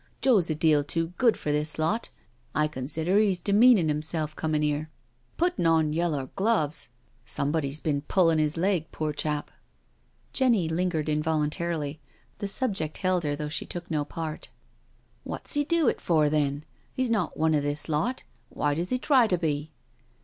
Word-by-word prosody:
" - - -38
Joe's 215 -11 +4
a 155 - 0
deal 155 -2 +3
too 165 +3 -2
good 235 -3 +4
for 150 - -2
this 150 +1 0
lot 180 +9 0 0.2
— 120 0 -38
I 150 +2 +3
consider 160 +7 0
he's 200 -4 +2
demeanin' 205 -1 +5
'imself 155 0 -2
comin' 155 -1 -1
here. 150 +1 -1 0.5
Puttin' 350 - +1
on 160 -2 +3
yellow 155 -5 -1
gloves 190 - 0
I - - -40 0.3
Somebody's 140 +2 -1
been 145 -3 -1
puUin' 165 0 +2
his 155 +1 +1
leg, 175 -3 0
poor 155 -1 -2
chap 150 0 -3
I" - - -31 0.8
Jenny 235 -10 +3
lingered 160 -2 -1
involuntarily. 150 0 -1 0.4
The 200 - -2
subject 195 - -2
held 185 -2 +1
her 145 0 0
though 150 +1 -4
she 150 - -3
took 175 -1 -6
no 150 -2 +1
part. 155 +1 -6 0.4
" - - -38
Wot's - - -3
he 290 - +2
do 330 -1 +1
it - - +1
for, 155 -4 +2
then? 145 -1 0 0.3
He's 255 -2 0
not 210 -7 0
one 160 0 +2
of 150 - +2
this 145 +1 -1
lot^why 155 - -2
does 170 +3 -2
he 255 - +1
try 255 -2 +4
to 180 - +1
be?" 155 -2 -2
160 Hz, 180 wpm, -27 LUFS, 150-185 Hz, 0.8 s, demeanin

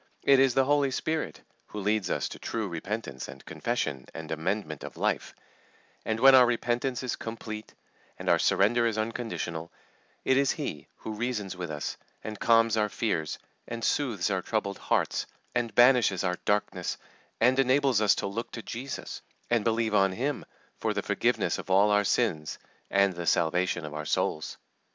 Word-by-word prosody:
It 135 -1 +6
is 135 -2 +4
the 135 - +4
Holy 145 0 +3
Spirit 155 +4 -2 0.2
who 105 - -6
leads 105 -1 0
us - - 0
to - - -9
true 110 -2 -3
repentance 85 - -5
and - - -11
confession 65 -2 -2
and 80 -1 -7
amendment 80 -1 -2
of - - -8
life; - - -1 0.7
and 110 0 -1
when 135 +2 +8
our 125 -2 +8
repentance 120 +2 -1
is 125 - -1
complete, 110 -1 -7 0.4
and - - -8
our - - +4
surrender 115 +4 +3
is 110 -2 -1
unconditional, 110 -7 -3 0.5
it 130 - +4
is 140 0 +3
He 140 - -5
who 110 - -7
reasons 105 -4 -3
with 90 -2 -5
us, 75 -2 -4 0.3
and 110 -2 -6
calms 115 -1 +4
our 105 -1 +2
fears, 85 -9 -1 0.3
and 115 -1 -5
soothes 115 -9 0
our 95 -1 0
troubled 100 -1 -2
hearts, - - 0 0.3
and 120 -2 -1
banishes 120 -7 +5
our 90 -1 -1
darkness, 105 0 0 0.4
and 125 +3 +4
enables 135 -3 +3
us 105 - +5
to - - -3
look 105 +4 -4
to 115 - -6
Jesus, 130 +3 -6 0.3
and 120 -3 +3
believe 115 -1 +1
on 95 -2 +4
Him 135 +6 -2 0.3
for - - -1
the - - -1
forgiveness - - +1
of - - -8
all 100 +3 +5
our 105 0 +4
sins 85 -10 0 0.3
and 100 -1 +3
the 85 -1 -5
salvation 85 0 +1
of 75 - -7
our 75 0 -5
souls. 80 +1 -1
110 Hz, 175 wpm, -28 LUFS, 95-120 Hz, 0.7 s, when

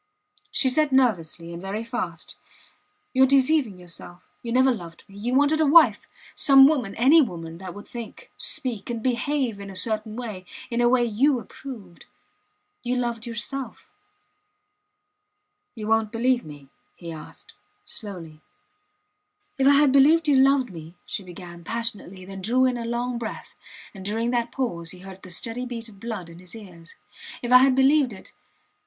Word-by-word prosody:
She 265 - +1
said 290 +3 +2
nervously, 175 -10 +1
and 170 - -7
very 200 +4 -4
fast: 185 -9 -5 0.8
You 260 - +2
are - - +9
deceiving 270 -5 +3
yourself. 175 0 -11 0.2
You 235 - -5
never 260 +2 +4
loved 170 -6 -9
me. 195 - -16
You 245 +4 -1
wanted 290 +3 +3
a - - +4
wife 320 +3 +6 0.3
some 270 -1 +7
woman 255 -10 0
any 275 +8 +6
woman 165 - -4
that 185 -1 -8
would 205 - -10
think, 235 -2 -9
speak, 250 -10 -3
and 230 -2 -4
behave 255 -2 -1
in 200 0 -8
a 195 - -9
certain 215 +2 -2
way 220 -6 -6 0.3
in 235 +1 0
a 240 - +4
way 245 -1 +3
you 250 +5 +2
approved. 215 -6 -11 0.7
You 250 +1 -1
loved 235 -1 -2
yourself. 245 +4 -5 1.8
You 215 -2 -6
wont 225 -1 +2
believe 245 +2 +1
me? 145 -3 -12 0.3
he 170 -2 -8
asked, 155 -1 -11 0.3
slowly. 170 -8 -7 1.2
If 270 - +4
I 285 - +7
had 285 -1 +5
believed 305 +4 +5
you 290 - +4
loved 265 -3 +4
me, 165 0 -10
she - - -4
began, 175 -2 -11
passionately, 205 -3 -4
then 195 0 -8
drew 250 +6 +2
in 255 -1 +1
a 235 -1 -4
long 240 +1 -2
breath; 225 -2 -7 0.4
and 190 -3 -10
during 225 +4 -1
that 240 -1 -1
pause 170 -11 -3
he 180 - -8
heard 190 0 -11
the 185 - -11
steady 230 +7 -3
beat 235 -2 -6
of 200 -2 -17
blood 220 -5 -5
in 170 0 -13
his 180 +4 -10
ears. 175 -6 -12 0.5
If 240 - -3
I 250 - +10
had 260 0 +4
believed 270 0 +4
it.. 190 - -13
230 Hz, 170 wpm, -24 LUFS, 190-260 Hz, 1.8 s, I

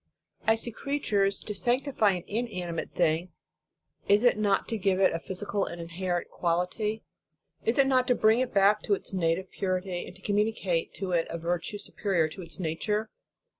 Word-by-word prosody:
As 225 0 +4
to 235 - -4
creatures, 210 -7 0
to 210 - -4
sanctify 240 -1 +2
an 180 -2 -4
inanimate 185 -7 -3
thing, 170 +1 +1 0.7
is 205 +3 +5
it 245 - +5
not 205 -2 +1
to 225 - -1
give 190 -1 +2
it 195 - +4
a 165 - -1
physical 200 +3 -2
and 170 - -7
in 165 0 -7
herent 175 0 -2
quality? 180 +6 -1 0.6
Is 225 - +1
it 275 - +6
not 255 -2 +3
to 250 - +4
bring 220 +1 +4
it 255 -1 0
back 200 +1 +4
to 205 - +2
its 195 - -8
native 180 +1 0
purity, 185 -1 -2
and 190 +2 -13
communicate 205 -5 0
to 190 -2 -4
it 170 -2 +1
a - - -3
virtue 175 +4 -2
superior 195 -4 0
to 170 - -9
its 170 +2 -6
nature? 210 +6 -1
195 Hz, 180 wpm, -28 LUFS, 175-215 Hz, 0.7 s, it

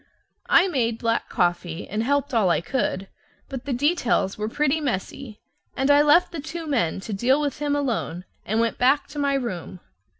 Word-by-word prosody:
I 355 +3 +6
made 235 -9 0
black 230 0 -1
coffee, 175 -2 -1
and 210 +2 -2
helped 285 +3 0
all 215 -6 +3
I 170 - +3
could, 195 -1 -2 0.4
but 265 -2 -6
the 285 - -3
details 250 - +1
were 215 +1 -3
pretty 300 +4 +1
messy, 235 -2 -4 0.4
and 270 +2 +3
I 285 0 +6
left 300 +5 +4
the 335 - -5
two 325 +2 -6
men 230 - 0
to 215 +1 -6
deal 250 +8 +2
with 290 -2 -2
him 290 -1 0
alone 225 - -2 0.2
and 220 +3 -1
went 230 0 0
back 265 +4 +3
to 295 - -7
my 280 -1 +1
room. 190 -9 -4
250 Hz, 190 wpm, -24 LUFS, 210-285 Hz, 0.4 s, I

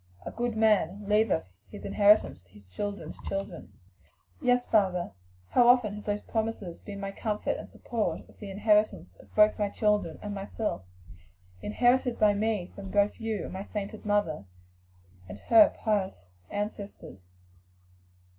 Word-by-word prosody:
'A - - -5
good 235 -1 -2
man 205 -2 +2
leaveth 210 -4 +2 0.3
an 205 - -9
inheritance 205 - +4
to 90 0 -26
his 105 -1 -16
children's 200 - -6
children.'" 195 -3 -5 0.7
"Yes, 245 0 +2
father, 185 - +1 0.4
how 245 - +5
often 245 -4 +5
have 210 0 -8
those 205 0 -2
promises 220 -6 -3
been 200 -1 -8
my 195 0 -4
comfort 210 +1 -2
and - - -9
support 230 -3 -3
as - - -19
the 205 - -8
inheritance 210 - +1
of - - -18
both 210 0 +5
my 205 -1 +1
children 210 -7 0
and 205 0 -4
myself; 200 - -3 0.8
inherited 245 +3 +2
by 210 -1 +4
me 205 -3 -1
from 195 -1 -8
both 205 +3 +1
you 225 -3 -2
and - - -7
my 190 - -5
sainted 210 +1 -6
mother 205 - 0 0.8
and 95 - -7
her 220 - +6
pious 195 - -1 0.2
ancestors." 205 - -6
205 Hz, 145 wpm, -28 LUFS, 195-220 Hz, 0.8 s, her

